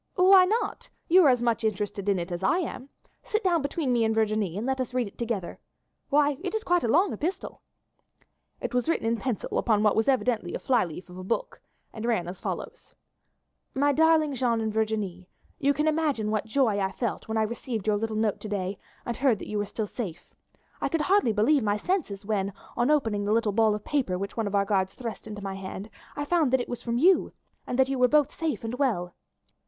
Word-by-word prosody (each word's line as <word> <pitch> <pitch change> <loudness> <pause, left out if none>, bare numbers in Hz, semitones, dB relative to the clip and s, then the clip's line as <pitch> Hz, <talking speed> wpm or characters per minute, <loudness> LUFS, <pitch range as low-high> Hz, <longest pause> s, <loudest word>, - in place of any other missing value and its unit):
"Why 370 0 +7
not? 440 +5 -2 0.2
You 365 +2 +7
are - - +7
as 245 -2 +2
much 235 -1 +1
interested 205 -1 -2
in 195 - +3
it 175 +1 -4
as 175 +1 -3
I 195 - +2
am. 280 -7 -4 0.3
Sit 430 +1 -2
down 345 -4 +2
between 280 -2 -1
me 235 -1 +2
and 220 0 +1
Virginie 215 -5 0
and 215 - -3
let 265 0 0
us 250 0 -5
read 250 -1 +1
it 200 - -10
together. 225 -7 -3 0.5
Why, 290 -1 +3
it 375 +2 -3
is 440 - -2
quite 355 0 +2
a - - +1
long 355 - +3
epistle." 370 +5 -4 1.0
It - - -4
was 250 +5 0
written 330 - 0
in 230 +1 +1
pencil 245 -2 -2
upon 215 -2 +2
what 210 - +4
was 220 - +1
evidently 245 -8 +1
a - - -3
fly 245 -6 +2
leaf 170 +2 -9
of 180 - -9
a - - -7
book, 480 - -3 0.3
and 220 - -7
ran 225 -7 0
as 180 +2 -8
follows: - - -6 0.8
"My 285 +2 +3
darling 315 0 +3
Jeanne 240 -3 +1
and 220 -1 -2
Virginie, 210 -5 -2 0.3
you 280 - +3
can 300 +2 0
imagine 300 -9 +1
what 215 0 -1
joy 220 -4 +2
I 190 -1 0
felt 235 +3 -3
when 220 0 -2
I 220 - +3
received 230 -1 -4
your 210 -1 +2
little 220 +1 -3
note 215 -1 0
to 215 - -7
day 195 -1 -3 0.3
and 235 - -2
heard 260 -5 +3
that - - -9
you 210 - -1
were 205 - -2
still 215 +1 -3
safe. 195 -6 -7 0.5
I - - 0
could 330 - 0
hardly 370 - +3
believe 225 +8 +3
my 205 -1 +1
senses 210 - -2
when, 200 -2 -1 0.2
on 240 +3 +1
opening 225 -9 +1
the 205 +1 +1
little 225 -2 +2
ball 220 0 +3
of 210 - -8
paper 255 -11 0
which 200 +2 -5
one 225 -2 -1
of 200 - -2
our 200 0 +3
guards 190 -2 0
thrust 230 -3 -6
into 210 -1 -7
my 195 -1 -3
hand, 195 +2 -7 0.2
I 290 - -3
found 315 -4 +2
that 260 - +5
it - - -5
was 245 -1 -5
from 235 -1 -2
you, 360 +8 +4 0.3
and 250 - -2
that 265 0 +4
you 270 -1 -2
were 250 - +6
both 295 +1 +3
safe 320 -6 -3
and 225 +1 -4
well. 180 -11 0
230 Hz, 235 wpm, -27 LUFS, 205-285 Hz, 1.0 s, Why